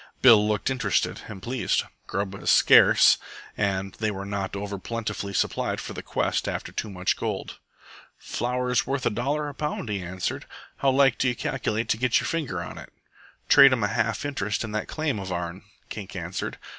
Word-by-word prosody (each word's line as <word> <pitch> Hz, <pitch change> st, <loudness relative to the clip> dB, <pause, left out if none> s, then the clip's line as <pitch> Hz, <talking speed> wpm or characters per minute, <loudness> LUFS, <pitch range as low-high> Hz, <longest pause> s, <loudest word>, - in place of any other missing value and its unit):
Bill 110 Hz, -5 st, +7 dB
looked 105 Hz, +4 st, 0 dB
interested 105 Hz, -7 st, 0 dB
and 100 Hz, -4 st, -9 dB
pleased. 125 Hz, 0 st, 0 dB, 0.2 s
Grub 100 Hz, 0 st, -2 dB
as 100 Hz, -, -3 dB
scarce, -, -, +7 dB, 0.4 s
and 95 Hz, -2 st, -1 dB
they 110 Hz, -1 st, +1 dB
were 100 Hz, -1 st, -5 dB
not 100 Hz, -1 st, -3 dB
over 100 Hz, 0 st, -4 dB
plentifully 105 Hz, -1 st, -4 dB
supplied 100 Hz, -, -1 dB
for -, -, -6 dB
the -, -, -6 dB
quest -, -, -1 dB
after -, -, -4 dB
Too 110 Hz, -, -4 dB
Much 90 Hz, -2 st, 0 dB
Gold. -, -, -4 dB, 0.6 s
"Flour's 125 Hz, +1 st, -1 dB
worth 135 Hz, -1 st, -2 dB
a -, -, +2 dB
dollar 145 Hz, +7 st, -1 dB
a 145 Hz, -, -6 dB
pound," 150 Hz, -5 st, -4 dB
he 100 Hz, -2 st, -2 dB
answered. 90 Hz, +1 st, -4 dB, 0.3 s
"How 140 Hz, -, +2 dB
like 135 Hz, -2 st, +4 dB
do 130 Hz, -, +2 dB
you 125 Hz, -, +1 dB
calculate 110 Hz, 0 st, -2 dB
to -, -, +2 dB
get 125 Hz, +1 st, +2 dB
your -, -, -4 dB
finger 165 Hz, -5 st, -2 dB
on -, -, -8 dB
it?" -, -, -12 dB, 0.6 s
"Trade 140 Hz, -2 st, +8 dB
'm 120 Hz, -4 st, 0 dB
a 105 Hz, -, +1 dB
half 115 Hz, +3 st, -1 dB
interest 105 Hz, -8 st, -2 dB
in 110 Hz, -, -5 dB
that 110 Hz, 0 st, -3 dB
claim 155 Hz, -8 st, -2 dB
of 95 Hz, -1 st, -6 dB
ourn," 85 Hz, +1 st, -4 dB, 0.3 s
Kink -, -, -7 dB
answered. -, -, -4 dB
110 Hz, 190 wpm, -25 LUFS, 100-125 Hz, 0.6 s, Trade